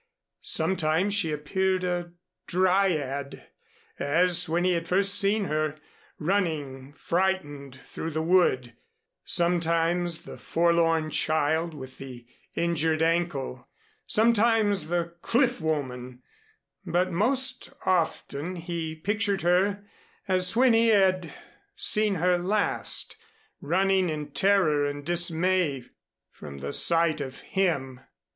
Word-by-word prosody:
Sometimes 185 Hz, +2 st, 0 dB
she 200 Hz, -6 st, +1 dB
appeared 185 Hz, +5 st, -1 dB
a 175 Hz, -1 st, -3 dB, 0.3 s
Dryad, 175 Hz, -7 st, 0 dB, 0.5 s
as 175 Hz, +4 st, +2 dB
when 170 Hz, +2 st, 0 dB
he 185 Hz, -, +2 dB
had 170 Hz, -1 st, -2 dB
first 195 Hz, +2 st, +3 dB
seen 205 Hz, +1 st, +2 dB
her, 155 Hz, -2 st, -2 dB, 0.4 s
running 150 Hz, -7 st, -2 dB
frightened 145 Hz, -7 st, -2 dB
through 160 Hz, -, -6 dB
the 160 Hz, 0 st, -3 dB
wood, 160 Hz, -9 st, +2 dB, 0.5 s
sometimes 170 Hz, 0 st, +1 dB
the -, -, -10 dB
forlorn 165 Hz, -2 st, +1 dB
child 155 Hz, +2 st, 0 dB
with 130 Hz, -2 st, -10 dB
the 125 Hz, -3 st, -10 dB, 0.3 s
injured 160 Hz, -1 st, 0 dB
ankle, 165 Hz, -7 st, -2 dB, 0.4 s
sometimes 220 Hz, -5 st, +3 dB
the 170 Hz, 0 st, -2 dB
cliff 245 Hz, -3 st, +1 dB
woman; 130 Hz, -5 st, -4 dB, 0.6 s
but 180 Hz, +2 st, 0 dB
most 255 Hz, +7 st, +1 dB, 0.2 s
often 175 Hz, -2 st, -1 dB
he 165 Hz, -2 st, -5 dB
pictured 200 Hz, +3 st, -1 dB
her 195 Hz, +4 st, +1 dB, 0.4 s
as 185 Hz, +1 st, +3 dB
when 250 Hz, 0 st, +4 dB
he 225 Hz, +1 st, +3 dB
had 185 Hz, -6 st, +2 dB, 0.4 s
seen 215 Hz, -2 st, +2 dB
her 180 Hz, +1 st, +1 dB
last, 205 Hz, -, -1 dB, 0.4 s
running 190 Hz, +3 st, +1 dB
in 150 Hz, -2 st, -5 dB
terror 180 Hz, -6 st, +2 dB
and 145 Hz, 0 st, -4 dB
dismay 175 Hz, -4 st, +1 dB, 0.5 s
from 70 Hz, -2 st, -11 dB
the 70 Hz, +1 st, -6 dB
sight 165 Hz, -2 st, +3 dB
of 135 Hz, -1 st, -7 dB
him. 140 Hz, -10 st, -2 dB
170 Hz, 110 wpm, -26 LUFS, 155-190 Hz, 0.6 s, when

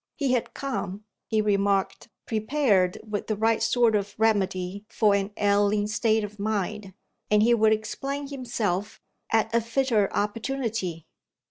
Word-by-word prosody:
He 275 Hz, -4 st, 0 dB
had 250 Hz, -2 st, -1 dB
come 215 Hz, -7 st, -4 dB, 0.2 s
(he 220 Hz, -1 st, +1 dB
remarked) 200 Hz, 0 st, 0 dB, 0.2 s
prepared 215 Hz, -5 st, +1 dB
with 210 Hz, -1 st, -3 dB
the 215 Hz, -, 0 dB
right 225 Hz, +2 st, +1 dB
sort 230 Hz, -1 st, +3 dB
of 205 Hz, 0 st, -2 dB
remedy 200 Hz, -3 st, 0 dB
for 215 Hz, -3 st, +3 dB
an 200 Hz, 0 st, 0 dB
ailing 205 Hz, 0 st, +2 dB
state 220 Hz, 0 st, +1 dB
of 210 Hz, 0 st, -7 dB
mind, 205 Hz, -2 st, -3 dB, 0.3 s
and 210 Hz, 0 st, +4 dB
he 240 Hz, +2 st, +5 dB
would 220 Hz, -1 st, +4 dB
explain 275 Hz, +6 st, -2 dB
himself 225 Hz, -7 st, -3 dB, 0.3 s
at 225 Hz, 0 st, +2 dB
a 235 Hz, -, +3 dB
fitter 230 Hz, -3 st, +1 dB
opportunity. 220 Hz, -, -2 dB
215 Hz, 140 wpm, -26 LUFS, 200-230 Hz, 0.3 s, he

